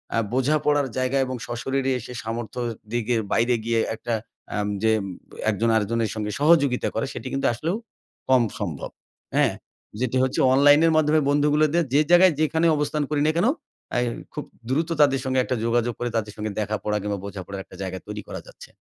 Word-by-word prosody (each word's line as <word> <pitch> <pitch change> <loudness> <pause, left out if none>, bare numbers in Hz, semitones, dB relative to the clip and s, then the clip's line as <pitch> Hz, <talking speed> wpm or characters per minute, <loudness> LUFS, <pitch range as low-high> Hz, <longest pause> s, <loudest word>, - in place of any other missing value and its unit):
আ - - +2 0.2
বোঝাপড়ার 145 +2 +2
জায়গা 130 +1 +1
এবং 130 0 -4
সশরীরে 135 +3 -1
এসে 125 +2 -9
সামর্থ্য 115 +1 -4 0.3
দিকে 120 0 0 0.2
বাইরে 120 +2 +3
গিয়ে 115 0 +1 0.2
একটা 115 +1 -4 0.4
আম 105 -1 -1 0.2
যে 110 - +4 0.6
একজন 110 +2 +1
আরেকজনের 110 +1 +1
সঙ্গে 105 -1 -3
সহযোগিতা 145 -4 +4
করে। 110 - 0
সেটি - - -6
কিন্তু 135 - +1
আসলেও 160 - -2 0.5
কম 130 -2 +5 0.2
সম্ভব। - - -4 0.5
হ্যাঁ? - - +3 0.5
যেটি 130 0 0
হচ্ছে 130 0 0
অনলাইনের 145 +4 +6
মাধ্যমে 155 0 +4
বন্ধুগুলোদের 150 +3 +3
যে 145 - +5
জায়গায় 175 0 +7
যেখানে 160 +2 +2
অবস্থান 150 +1 0
করি 150 -1 0
না 155 - +4
কেনো। 215 +10 +3 0.5
এ - - +4 0.3
খুব - - -4 0.3
দ্রুত 160 +6 0
তাদের 140 -2 +4
সঙ্গে 130 0 +1
একটা 130 - -1
যোগাযোগ 120 0 +1
করে। 120 - -1
তাদের 105 -2 -3
সাথে 105 0 -4
দেখা 105 0 -1
পড়া 105 0 0
কিংবা 100 0 -3
বোঝাপড়ার 100 -1 -6
একটা - - -15
জায়গা 95 -1 -4
তৈরি 105 0 -5
করা - - -6
যাচ্ছে। - - -13
130 Hz, 175 wpm, -24 LUFS, 110-145 Hz, 0.6 s, জায়গায়